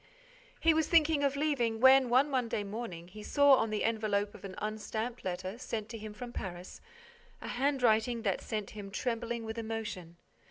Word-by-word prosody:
He 330 - +4
was 315 0 +1
thinking 315 -3 +4
of 280 0 +2
leaving, 270 -7 0
when, 260 0 +7
one 260 +4 +4
Monday 245 -6 -1
morning, 200 -5 -6
he 210 +3 -10
saw, 285 +5 +5
on 225 - 0
the 215 -1 -1
envelope 210 -2 0
of - - -13
an 190 -1 -7
unstamped 220 +3 -4
letter, 185 +4 -4
sent 225 -3 -3
on - - -27
to 230 - -6
him 215 0 -7
from 240 +3 -8
Paris, 180 -3 -7 0.6
a - - -8
handwriting 245 -3 +2
that 195 -4 0
set 215 -2 -4
him 205 -2 -8
trembling 235 +2 -2
with 220 +1 -5
emotion. 220 -7 -5
225 Hz, 185 wpm, -32 LUFS, 210-250 Hz, 0.6 s, when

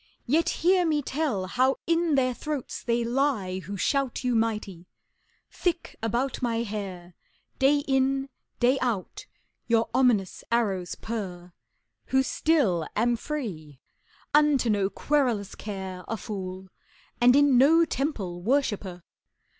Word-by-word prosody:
Yet 315 +7 +2 0.2
hear 365 0 +5
me 305 -3 +1
tell 260 -10 -1
how 255 +7 +2
in 335 -2 +2
their 255 -2 +2
throats 295 0 -5
they 235 0 0
lie 235 -7 0
Who 195 +3 -7
shout 270 +6 0
you 250 -1 +1
mighty: 215 -6 -2 0.6
thick 345 -2 -2
about 240 +4 -1
my 235 -2 0
hair 190 -5 -6 0.5
Day 285 +2 +4
in, 270 0 +1 0.3
day 255 +2 +3
out, 230 -7 -3 0.4
your 230 -1 +2
ominous 230 -8 +2
arrows 195 -6 0
purr 180 -6 -6 0.5
Who 265 0 +3
still 240 - +1
am 235 +3 +2
free, 195 - -6 0.5
unto 290 -5 +4
no 200 -2 +1
querulous 245 -7 0
care 190 -3 -6
A 225 - -3
fool, 190 -2 -6 0.5
and 245 +1 +6
in 285 -2 +5
no 325 +5 +6
temple 215 - -3
worshiper! 205 -7 -1
235 Hz, 125 wpm, -26 LUFS, 195-275 Hz, 0.6 s, and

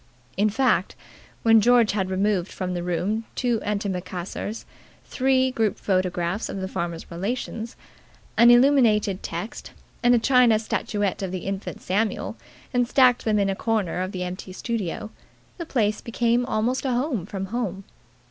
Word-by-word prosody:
In 210 +2 +2
fact, 255 +5 +1 0.5
when 225 -1 +6
George 240 0 +5
had 190 -2 -1
removed 190 -1 0
from 185 -1 -4
the 175 - -2
room 185 +6 -1
two 240 -3 0
antimacassars, 200 0 -4 0.4
three 260 0 +2
group 220 -5 0
photographs 185 +1 -1
of - - -5
the 190 - -3
farmer's 170 -3 -5
relations, 225 +5 -4 0.6
an 235 +1 +7
illuminated 240 -6 +4
text, 175 +7 -6 0.3
and 245 0 +5
a - - +5
china 245 -2 +4
statuette 205 -2 -2
of 190 -2 -3
the 185 -1 -5
Infant 195 0 -5
Samuel, 210 +4 -1 0.4
and 245 -1 +2
stacked 250 -1 +4
them 215 -2 +2
in 200 -1 +2
a - - -2
corner 205 -5 -1
of 185 +1 -3
the 185 -2 -4
empty 185 +1 -6
studio, 215 -1 -4 0.5
the 335 - -5
place 215 -7 0
became 235 +1 0
almost 240 +4 0
a 260 -2 0
home 245 - -1
from 195 -2 -4
home. 200 -6 -2
210 Hz, 155 wpm, -24 LUFS, 190-240 Hz, 0.6 s, an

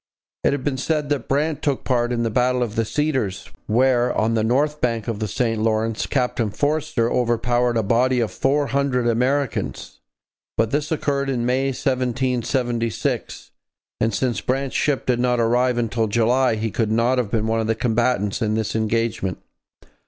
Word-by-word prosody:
It - - +3
has 140 -2 -3
been 135 -2 -1
said 150 +1 -1
that 145 -5 -1
Brant 150 +2 0
took 140 -3 -1
part 120 -2 +1
in 120 -1 0
the 115 - -1
Battle 125 +2 +2
of 110 -2 -5
the 115 - +1
Cedars, 130 -8 -2 0.2
where, 125 +2 +3
on 110 +1 +1
the 110 -1 +1
north 145 +6 +1
bank 115 -2 -1
of 115 -3 -3
the 110 - -2
St 115 +1 -1
Lawrence, 110 0 0
Captain 125 -4 0
Forster 145 -1 0
overpowered 120 0 +1
a 110 - +1
body 125 +5 +2
of 115 -3 0
four 145 +2 +1
hundred 135 -3 0
Americans; 125 - -1 0.6
but 115 0 +1
this 145 +2 -1
occurred 140 -3 0
in 120 -3 -1
May 130 +2 +1
1776, 125 -3 -1 0.5
and 110 - +1
since 120 +2 -1
Brant's 135 +1 -2
ship 145 -3 0
did 125 -1 +1
not 125 -1 +1
arrive 120 +2 +2
until 115 -1 0
July 120 +3 +2
he 110 0 -2
could 110 0 -1
not 120 +3 +2
have 120 -5 -1
been 110 0 0
one 110 0 0
of 110 - -1
the 110 - +1
combatants 115 -2 0
in 110 -1 +1
this 110 -1 -2
engagement. 110 -4 -1
120 Hz, 175 wpm, -22 LUFS, 115-130 Hz, 0.6 s, It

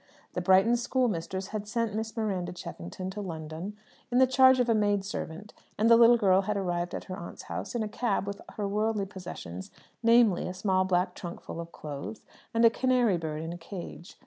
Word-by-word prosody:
The - - -2
Brighton 190 +5 +5
schoolmistress 200 -7 -1
had 210 -1 -4
sent 230 -1 -1
Miss 220 +1 -4
Miranda 190 -5 -1
Cheffington 180 - -7
to 205 +2 -5
London 165 +2 -6 0.3
in 245 - +2
the 260 - +7
charge 260 0 +6
of 245 - +2
a 230 - +4
maid 205 -2 +1
servant, 200 0 -6 0.2
and 225 +2 +3
the - - +10
little 235 +1 +7
girl 195 -3 +4
had 210 +1 -2
arrived 175 -2 -2
at - - -5
her 185 - -6
aunt's 170 -3 -8
house - - -5
in 230 - 0
a - - -2
cab 210 -2 -1
with 200 0 -5 0.2
her 205 -2 -1
worldly 210 0 0
possessions, 175 - -8 0.3
namely, 230 -5 +4
a 180 - -5
small 185 -1 +1
black 180 0 +1
trunk 175 -1 -7
full - - -8
of 170 0 -9
clothes, 150 +9 -7 0.3
and 230 0 +4
a 230 - +7
canary 245 -6 +2
bird 155 -1 -4
in 165 +1 -4
a 175 - -8
cage. 175 0 -9
200 Hz, 205 wpm, -29 LUFS, 180-225 Hz, 0.3 s, the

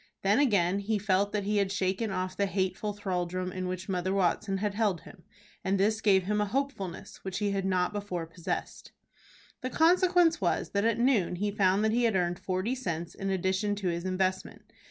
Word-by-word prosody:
Then 200 +5 +3
again 200 -8 +3
he 210 +2 0
felt 200 0 +1
that 205 -1 -1
he 210 +1 0
had 200 -1 +1
shaken 195 +3 -1
off 185 -1 -3
the 200 +1 +1
hateful 190 +2 -1
thraldom 185 -2 -3
in 185 0 -4
which 185 +1 -4
Mother 185 -1 -1
Watson 195 +1 +1
had 205 +1 -1
held 205 -5 0
him, 195 - -14 0.4
and 190 0 +1
this 215 +2 +2
gave 195 -3 +4
him 210 +3 0
a - - +2
hopefulness 215 -7 -3
which 190 -1 -5
he 205 -1 0
had 195 -1 -1
not 185 0 +1
before 200 -5 -3
possessed. 165 +1 -5 0.7
The 255 - -2
consequence 350 - +4
was 175 - 0
that 200 +1 +1
at 230 -1 +2
noon 235 -8 +2
he 205 +3 -1
found 195 0 +2
that 220 - +2
he 240 +1 +2
had 225 -3 +2
earned 175 -1 0
forty 185 +6 -1
cents 170 -10 -4
in 195 - -4
addition 190 +2 0
to 195 -3 -2
his 170 0 -2
investment. 185 0 -2
195 Hz, 200 wpm, -29 LUFS, 185-210 Hz, 0.7 s, gave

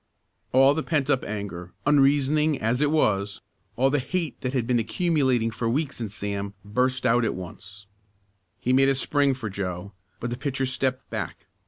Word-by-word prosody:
All 135 +2 +6
the 160 - -1
pent 145 -3 0
up 135 - +2
anger 95 -4 -5
unreasoning 145 +1 +3
as 115 +4 0
it 150 - +3
was, 100 -10 +1 0.4
all 135 +3 +3
the 145 - +2
hate 160 +3 -3
that 125 - -1
had 130 -4 0
been 120 0 +2
accumulating 130 - +1
for 115 +1 -2
weeks 145 0 -1
in 110 - -3
Sam, 100 -1 -4
burst 125 +4 0
out 120 0 +4
at 115 - 0
once. 100 +3 -9 0.7
He 125 - +1
made 135 +1 +5
a 135 - +3
spring 140 0 +2
for 120 -4 -5
Joe, 95 -1 -4 0.3
but 120 - -3
the 120 - -4
pitcher 135 -1 -1
stepped 130 0 -2
back. - - -5
125 Hz, 180 wpm, -25 LUFS, 105-140 Hz, 0.7 s, All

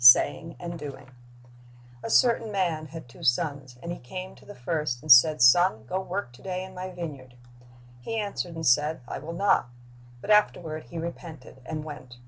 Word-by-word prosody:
Saying 160 +7 +6
and 170 -1 -6
Doing 135 -3 -9 0.9
A - - -5
CERTAIN 230 -2 +3
man 170 -6 -1
had 160 -2 -9
two 120 - -16
sons; 135 -1 0
and 170 - -4
he 175 - -5
came 185 +9 -7
to - - -19
the 205 - -10
■^ - - -19
first, 150 -1 -2
and 155 - +2
said, 130 +2 +8
Son, 125 -3 +5
go 185 - -2
work 185 -9 -4
to - - -16
day 185 -1 -4
in 190 0 -10
my 185 0 -6
vineyard. 145 -8 -8 0.6
He 225 - -5
answered 200 -5 -3
and 165 0 -4
said, 150 +4 +3
I - - -5
will 155 +4 -7
not; 190 -8 +2 0.5
but 205 - -3
afterward 165 -7 +2
he 170 - -9
repented, 165 -5 -8
and 155 -1 -4
went. 130 -5 -10
160 Hz, 190 wpm, -27 LUFS, 135-180 Hz, 0.9 s, said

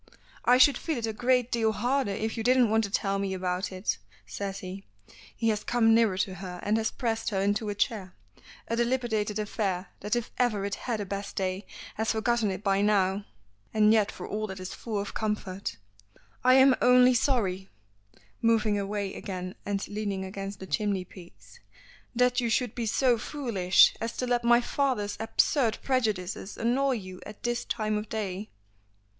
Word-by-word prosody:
"I 250 - +6
should 260 0 +6
feel 320 -4 -2
it 230 - -2
a 220 - -3
great 250 +2 +1
deal 225 -2 +2
harder 250 +2 0
if 215 +3 -2
you 230 - -3
didn't 245 -1 +4
want 225 0 +3
to - - -6
tell 195 0 0
me 195 -1 -2
about 185 +1 -2
it," 185 - -2 0.3
says 195 - -5
he. 190 +1 -7 0.5
He 225 -1 +1
has 210 -1 -1
come 225 -2 +3
nearer 225 -5 +3
to 190 0 -1
her 180 -1 -7
and 210 - +1
has 220 -1 0
pressed 225 -3 -2
her 195 -3 -1
into 205 +2 0
a 205 - -3
chair 195 -3 -2 0.5
a 230 - -1
dilapidated 235 -4 0
affair 195 -3 -2
that 210 +3 -1
if 240 -2 -3
ever 215 -5 +1
it 200 - -3
had 225 -1 -3
a - - -3
best 200 +1 -5
day 190 +1 -2 0.3
has 220 +1 +1
forgotten 225 0 +1
it 190 +1 -4
by 195 -1 +2
now 200 -1 +2 0.5
and 215 0 +5
yet 215 -2 +3
for - - -8
all 215 +1 -3
that 190 -1 -7
is 185 0 -6
full 220 -3 -4
of 200 - -5
comfort. 205 -3 -3 0.7
"I 255 +1 +6
am 265 0 +7
only 250 0 +6
sorry" 200 -7 0 0.7
moving 220 -2 +2
away 200 -1 -3
again 185 -2 -5
and 200 -1 -2
leaning 205 -2 -3
against 195 +1 -6
the 190 - -7
chimney 200 -2 -1
piece 100 - -15 0.6
"that 250 +1 +3
you 235 - 0
should 235 0 0
be 235 -2 -3
so 245 +1 +2
foolish 220 -10 +3
as 230 +1 -3
to 255 - -1
let 245 -1 +1
my 240 0 +5
father's 245 -6 -1
absurd 230 +1 +2
prejudices 215 -7 -1
annoy 260 +4 +1
you 185 -5 -7
at 210 0 -11
this 240 0 -1
time 215 -2 -1
of 210 - -8
day." 205 -2 -4
215 Hz, 185 wpm, -28 LUFS, 195-235 Hz, 0.7 s, am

